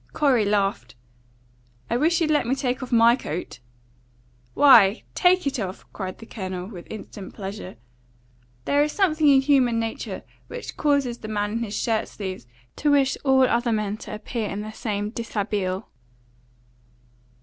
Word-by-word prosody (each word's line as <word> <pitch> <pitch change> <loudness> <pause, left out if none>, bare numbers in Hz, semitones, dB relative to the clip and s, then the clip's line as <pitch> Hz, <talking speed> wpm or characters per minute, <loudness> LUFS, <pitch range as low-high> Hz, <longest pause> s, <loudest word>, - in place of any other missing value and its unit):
Corey 260 -7 +3
laughed. 195 - 0 0.9
"I 235 - -1
wish 320 +7 +2
you'd 310 -1 +2
let 295 -6 +2
me 260 - +1
take 255 -1 -2
off 255 - -6
MY 235 0 +6
coat." 155 - -6 1.0
"Why, 230 -7 +6
TAKE 365 -1 +3
it 280 -2 -1
off!" 190 -2 -5
cried 185 -2 -5
the 225 - -12
Colonel, 185 -5 -5
with 185 -4 -10
instant 205 -2 -9
pleasure. 195 -1 -7 0.9
There 285 - +3
is 300 0 +1
something 315 -6 +2
in 275 -2 +6
human 260 -4 +3
nature 225 -1 -4 0.2
which - - -7
causes 280 -5 +1
the 215 - -8
man 205 -1 -1
in 230 - -2
his 215 -3 -3
shirt 225 -2 0
sleeves 185 - -7 0.3
to 295 - +1
wish 275 -2 +3
all 265 -1 +4
other 240 -1 +2
men 210 -2 -1
to - - -7
appear 215 0 -4
in 200 - -4
the 215 +1 -6
same 210 -2 -3
deshabille. 205 -4 -2
230 Hz, 160 wpm, -24 LUFS, 205-270 Hz, 1.0 s, MY